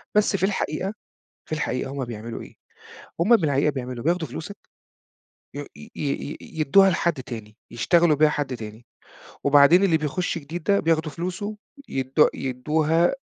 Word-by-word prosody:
بس 210 -1 +3
في 190 - -2
الحقيقة 195 -1 -2 0.6
في - - -8
الحقيقة 135 -3 -2
هم 140 -2 -3
بيعملوا 115 -1 -7
إيه؟ - - -13 0.7
هم 220 +8 +6
في 170 - -3
الحقيقة 140 +1 +2
بيعملوا 125 -3 -6
بياخدوا 170 -2 0
فلوسك، 165 +10 -7 1.0
ي 145 - -3
ي 220 - -13
ي 145 0 -3
ي - - -8 0.2
يدوها 195 +6 +6
لحد 170 -1 +1
تاني، 110 -4 -9 0.2
يشتغلوا 165 +6 +3
بيها 155 +1 +5
حد 145 -4 -2
تاني 110 +1 -10 0.6
وبعدين 145 +6 +6
اللي 165 -5 +3
بيخش 155 +4 -2
جديد 160 +3 -7
ده 200 +3 +2
بياخدوا 160 -1 +1
فلوسه 185 +6 -4 0.3
يدو 135 +3 +2
يدوها 155 +6 +1
155 Hz, 155 wpm, -24 LUFS, 130-175 Hz, 1.0 s, هم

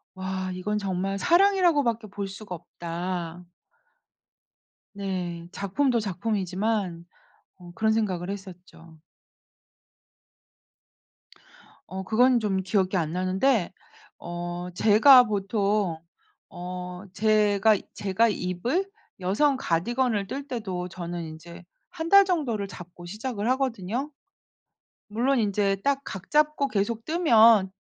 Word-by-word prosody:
'와 190 0 -4
이건 210 +3 -2
정말 195 -1 -2
사랑이라고 350 - +4
밖에 230 -3 -1
볼 200 0 -5
수가 195 -1 -8
없다.' 175 +1 -5 1.5
네. 180 -4 -4
작품도 235 +6 0
작품이지만 195 -2 -2 0.5
어 175 -2 -13
그런 220 +1 +1
생각을 190 -5 -1
했었죠. 180 -4 -10 2.9
어 190 +2 -6
그건 245 +5 +3
좀 195 -3 0
기억이 190 0 0
안 160 -3 -1
나는데 185 +4 +1 0.5
어 175 +1 -5
제가 245 +6 +7
보통 200 -3 0 0.5
어 180 0 -7
제가, 210 +1 +3 0.2
제가 205 +4 +1
입을 220 - -1 0.3
여성 260 +10 +2
가디건을 220 +4 0
뜰 275 +6 -6
때도 190 -7 -4
저는 175 0 -6
인제 160 +2 -10 0.3
1 330 -2 -5
달 395 +2 +8
정도를 275 - -1
잡고 175 -2 -11
시작을 215 +2 -4
하거든요. 255 0 -1 1.0
물론 250 +5 +1
인제 200 -2 +1
딱 280 -1 +2
각 190 -1 -8
잡고 300 -1 +2
계속 225 0 -2
뜨면 230 - +5
200 Hz, 205 characters per minute, -26 LUFS, 180-235 Hz, 2.9 s, 달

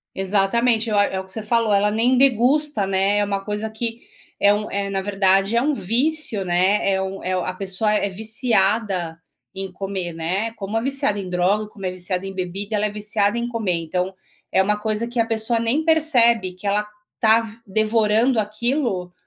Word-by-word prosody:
Exatamente. 215 +4 +1
Eu 210 - +2
a 205 - +5
é 190 - -2
o 190 - -8
que 190 - -11
você 220 - -5
falou, 225 0 +1
ela 205 +1 +3
nem 235 +4 +2
degusta, 270 -2 +3
né. 195 +1 +1
É 205 - +2
uma 200 -1 -2
coisa 210 +1 -3
que, 230 +1 -5 0.4
é 200 - +5
um 210 +1 -2
é, 200 0 -2
na 195 -1 -1
verdade, 195 +1 +2
é 235 - +3
um 300 - +1
vício, 245 - -1
né. 185 +3 +2
É 190 - +1
um, 190 0 -5
é 185 - -2
a 185 0 -2
pessoa 195 +3 0
é 210 -1 +1
viciada 205 -5 0 0.4
em 195 0 -5
comer, 190 -2 -4
né. 185 +7 -2
Como 205 0 -5
é 225 - +1
viciada 270 -5 -1
em 190 -2 -5
droga, 185 +4 +1
como 205 -3 -8
é - - 0
viciada 185 +1 -4
em 195 - -6
bebida, 195 +3 -4
ela 210 +1 +1
é - - -3
viciada 210 +1 0
em 235 0 -2
comer. 225 -6 -1
Então, 180 +3 -2 0.4
é 190 - +4
uma 210 +2 +1
coisa 215 +2 -1
que 240 0 -5
a 230 - +3
pessoa 225 +1 0
nem 230 +7 0
percebe 245 - +3
que 185 +3 -10
ela 210 +1 +1 0.3
está 220 0 +4
v 225 0 -9
devorando 220 +3 +2
aquilo. 215 -3 -1
210 Hz, 200 wpm, -21 LUFS, 190-230 Hz, 0.4 s, a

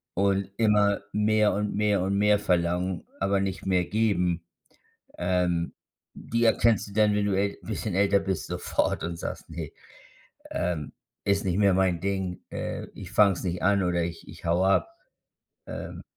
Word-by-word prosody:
und 100 0 +1
immer 105 -2 +3
mehr 105 0 +3
und 105 0 -2
mehr 105 -2 +2
und 95 +2 0
mehr 105 0 +4
verlangen, 90 -1 0 0.2
aber 100 0 +2
nicht 95 -1 -3
mehr 90 -2 +2
geben. 90 -6 0 0.7
Ähm, 90 -1 0 0.4
die 115 +1 -2
erkennst 115 -2 +3
du 100 - -11
dann, 105 -1 +4
wenn 105 0 +1
du 100 - +1
äl 100 0 0
bisschen 105 -3 -4
älter 100 0 +4
bist, 95 -2 -3
sofort - - -1
und 85 0 -3
sagst: - - -6
„Ne, - - -6 0.8
ähm, 85 -5 -2 0.3
ist 100 0 +1
nicht 90 0 0
mehr 100 -2 +4
mein 90 -3 +2
Ding. 95 -2 -2
Äh, - - -4
ich 95 +1 -9
fange 105 -3 +5
es 85 - -7
nicht 90 -1 -3
an 100 +1 +3
oder 85 -1 +1
ich 85 -1 -6
ich - - -12
haue 90 +3 +2
ab“, 95 - +3 0.8
ähm, - - -7
95 Hz, 165 wpm, -27 LUFS, 90-105 Hz, 0.8 s, fange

